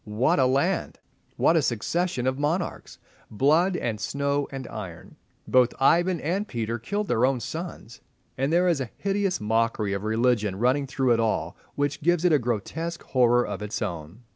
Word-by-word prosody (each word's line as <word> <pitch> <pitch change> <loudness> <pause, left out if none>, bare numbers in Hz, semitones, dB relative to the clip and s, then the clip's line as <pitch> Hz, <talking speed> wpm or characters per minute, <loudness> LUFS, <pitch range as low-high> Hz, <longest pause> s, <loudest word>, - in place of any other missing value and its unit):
What 110 +6 +1
a 130 - +4
land! 140 +8 0 0.4
What 165 - +4
a 160 - +4
succession 130 +3 -1
of 130 +1 0
monarchs! 165 +5 -2 0.3
Blood 155 - +2
and 110 -7 -3
snow 140 +3 -1
and 135 -1 -6
iron! 95 -6 -8 0.3
Both 125 -1 +3
Ivan 175 +5 +3
and 190 +7 -1
Peter 115 - -3
killed 205 - -3
their 115 - +1
own 130 -1 +2
sons. 155 -4 -7 0.3
And 135 +3 -1
there 175 +2 +3
is 165 -6 +1
a 125 - -4
hideous 195 -2 0
mockery 110 -1 0
of 100 0 -3
religion 110 -2 +1
running 130 +5 +1
through 130 -2 +1
it 115 - +1
all 110 -1 -1 0.2
which 145 0 -1
gives 175 +2 +2
it 175 - +4
a 150 - +5
grotesque 130 - -3
horror 120 -1 +3
of - - -5
its 105 +1 -4
own. 85 +6 -6
130 Hz, 175 wpm, -25 LUFS, 115-165 Hz, 0.4 s, a